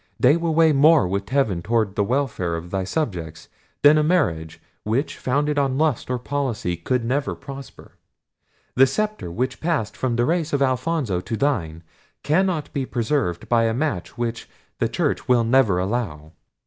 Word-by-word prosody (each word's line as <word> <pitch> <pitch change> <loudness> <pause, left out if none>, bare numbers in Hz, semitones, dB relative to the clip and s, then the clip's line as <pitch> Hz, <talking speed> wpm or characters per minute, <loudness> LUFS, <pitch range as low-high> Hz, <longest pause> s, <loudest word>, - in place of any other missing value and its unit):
They 135 +4 +5
will 170 -2 -1
weigh 160 -1 +5
more 150 - +5
with 100 +2 -3
heaven 130 -11 +1
toward 110 0 0
the 100 - +2
welfare 115 -8 -1
of 85 +1 -7
thy 95 -1 -1
subjects, 90 - -4 0.3
than 150 +1 +7
a - - +2
marriage, 80 - 0 0.2
which, 120 +8 -2
founded 145 +3 0
on 135 -2 0
lust 155 -6 0
or 125 - 0
policy, 125 -8 -2
could 115 +8 -1
never 140 +4 -1
prosper. 140 -1 -11 0.8
The 135 +1 +5
sceptre, 215 - -2
which 125 +9 -3
passed 155 -11 -1
from 125 -2 -1
the 120 +1 +2
race 165 0 -1
of 140 - +1
Alfonso 130 - 0
to 115 +4 -4
thine, 85 - -1 0.4
cannot 165 -2 0
be 140 - -1
preserved 115 - -1
by 115 -1 +3
a 115 0 0
match 125 - -3
which 120 -1 -4 0.3
the - - +1
church - - -1
will 125 -2 +4
never 115 -5 +3
allow. 90 -6 -3
125 Hz, 170 wpm, -22 LUFS, 100-145 Hz, 0.8 s, than